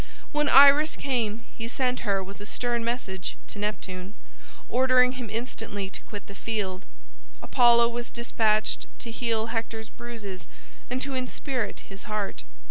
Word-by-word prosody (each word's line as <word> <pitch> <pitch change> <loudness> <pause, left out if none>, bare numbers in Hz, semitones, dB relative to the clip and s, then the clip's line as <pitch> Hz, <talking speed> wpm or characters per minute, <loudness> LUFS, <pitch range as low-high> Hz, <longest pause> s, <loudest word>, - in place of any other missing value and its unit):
When 295 -1 +2
Iris 285 +3 +8
came 235 -5 -1
he 230 - -4
sent 250 +1 0
her 200 -3 +1
with 200 +2 -10
a - - -6
stern 240 0 -1
message 220 -6 -3
to 205 - -7
Neptune, 195 -2 -4 0.5
ordering 255 0 +5
him 255 -3 -6
instantly 220 -4 -3
to - - -7
quit 205 -2 -8
the 200 - -10
field. 200 -4 -3 0.6
Apollo 235 -1 +6
was 240 0 -4
despatched 220 -3 +1
to 235 - -5
heal 230 -1 -1
Hector's 225 -1 -3
bruises 215 -6 -8 0.4
and 255 +1 -1
to 275 0 -3
inspirit 255 -2 -2
his 195 0 -11
heart. 210 -2 -3
230 Hz, 145 wpm, -27 LUFS, 205-250 Hz, 0.6 s, Iris